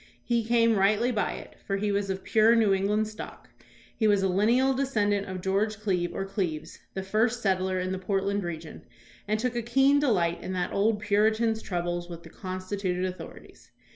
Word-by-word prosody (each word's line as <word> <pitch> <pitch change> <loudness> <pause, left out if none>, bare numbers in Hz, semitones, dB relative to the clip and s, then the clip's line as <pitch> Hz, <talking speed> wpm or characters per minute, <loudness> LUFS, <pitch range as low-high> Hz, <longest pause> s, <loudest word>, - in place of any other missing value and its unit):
He 235 -1 +1
came 230 -1 +3
rightly 210 +5 +3
by 215 -3 -1
it, - - -10
for 195 - 0
he 205 +1 -1
was 200 0 -1
of 190 0 -3
pure 225 +1 +4
New 220 -4 +4
England 205 +3 +1
stock. 215 0 -10 0.4
He 220 - +1
was 205 -2 +3
a - - +3
lineal 235 +8 +3
descend 255 -7 +1
ant 200 0 -1
of 185 -1 -5
George 200 +3 0
Cleve, 185 -5 -1
or 195 - -2
Cleaves, 185 -6 -4 0.2
the 190 - -3
first 225 +5 0
settler 185 -1 +1
in 185 0 -2
the 190 - -3
Portland 195 +1 -1
region, 165 -2 -7 0.5
and 215 +1 0
took 250 +1 -1
a 240 - 0
keen 270 +5 +3
delight 180 -12 +1
in 185 - -5
that 180 -1 -2
old 210 +1 +1
Puritan's 220 +2 +2
troubles 175 -1 -3
with 170 -1 -8
the - - -12
constituted 185 0 -3
authorities. 185 0 -9
200 Hz, 195 wpm, -27 LUFS, 185-220 Hz, 0.5 s, pure